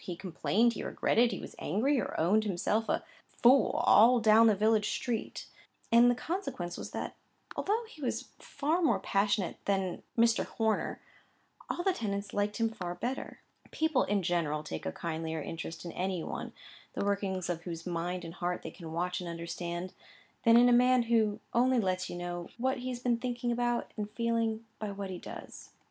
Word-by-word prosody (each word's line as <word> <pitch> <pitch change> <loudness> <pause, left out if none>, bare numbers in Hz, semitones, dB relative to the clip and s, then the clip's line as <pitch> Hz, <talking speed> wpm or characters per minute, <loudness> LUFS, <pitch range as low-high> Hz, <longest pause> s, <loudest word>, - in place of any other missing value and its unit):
He 180 - -5
complained, 200 +6 +1
he - - -5
regretted, 235 +1 +2
he - - -3
was - - -8
angry, 245 - +1
or - - -4
owned 195 +7 +3
himself 210 +3 0
a - - +1 0.2
—— - - -42 0.2
fool, 255 +2 +5
all 245 0 +7
down 220 +1 +6
the 215 - +5
village 215 +1 +2
street; 235 -4 -3 0.5
and 235 +1 +7
the 245 - +3
consequence 250 - -4
was - - -6
that, - - -5 0.4
although 440 +4 0
he 310 - -14
was 255 - -1
a - - -19 0.2
far 315 +5 -1
more 305 - +3
passionate 200 -1 0
man 190 -2 0 0.2
than 230 - +7
Mr. 230 -1 +2
Horner, 220 -1 -1 0.7
all 350 - -2
the 385 - +3
tenants 200 - -3
liked 205 0 0
him 230 -1 +2
far 180 -5 -5
better. 255 +7 -4 0.3
People, 315 -4 +1
in 200 -2 0
general, 160 -3 0
take 80 - -5
a - - -1
kindlier 160 - -3
interest 165 +3 -6
in 170 - -5
any 185 -1 -2
one, - - -5 0.4
the - - -2
workings 195 -3 -1
of 175 -2 -2
whose 165 -2 -6
mind 175 0 -3
and 165 - -7
heart 180 0 -3
they - - -6
can 165 -3 -9
watch 180 +2 -1
and 175 - -5
understand, 170 +1 -5 0.5
than 230 0 +7
in 245 +1 +7
a 245 - +5
man 250 0 +5
who 220 -3 +2
only 250 +1 +4
lets 185 -3 -1
you - - -5
know 175 0 -5
what 260 +2 0
he 255 +1 -4
has 250 - -3
been 245 -1 +1
thinking 245 0 -2
about 240 0 0
and 210 -1 -4
feeling, 230 0 -1
by 215 - -3
what 200 -1 -5
he 180 - -5
does. - - -9
210 Hz, 195 wpm, -31 LUFS, 180-240 Hz, 0.7 s, all